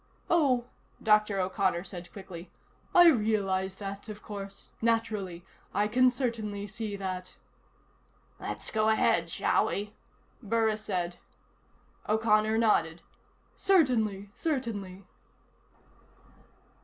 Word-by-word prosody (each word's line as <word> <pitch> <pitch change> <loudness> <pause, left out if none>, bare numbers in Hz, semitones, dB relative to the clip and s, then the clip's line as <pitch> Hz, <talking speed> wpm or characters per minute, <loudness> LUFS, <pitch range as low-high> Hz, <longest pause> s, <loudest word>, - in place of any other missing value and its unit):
"Oh," 270 -8 +3 0.4
Dr. 210 -2 +4
O'Connor 185 -1 0
said 180 -3 -8
quickly. 185 -3 -9 0.5
"I 350 -1 +9
realize 200 -7 +1
that, 200 +1 -7
of 210 0 -8
course. 200 -1 -8
Naturally. 215 -6 -1 0.3
I 205 +1 +3
can 255 +4 +5
certainly 225 -5 -3
see 215 0 -5
that." 185 -2 -5 1.0
"Let's - - -4
go 215 0 +2
ahead, 220 - +3
shall - - +2
we?" 205 +1 -3 0.5
Burris 220 -1 +1
said. 180 -4 -2 0.9
O'Connor 215 0 +3
nodded. 170 -7 +2 0.5
"Certainly. 230 - +2
Certainly." 210 - -3
210 Hz, 95 wpm, -29 LUFS, 195-225 Hz, 1.0 s, I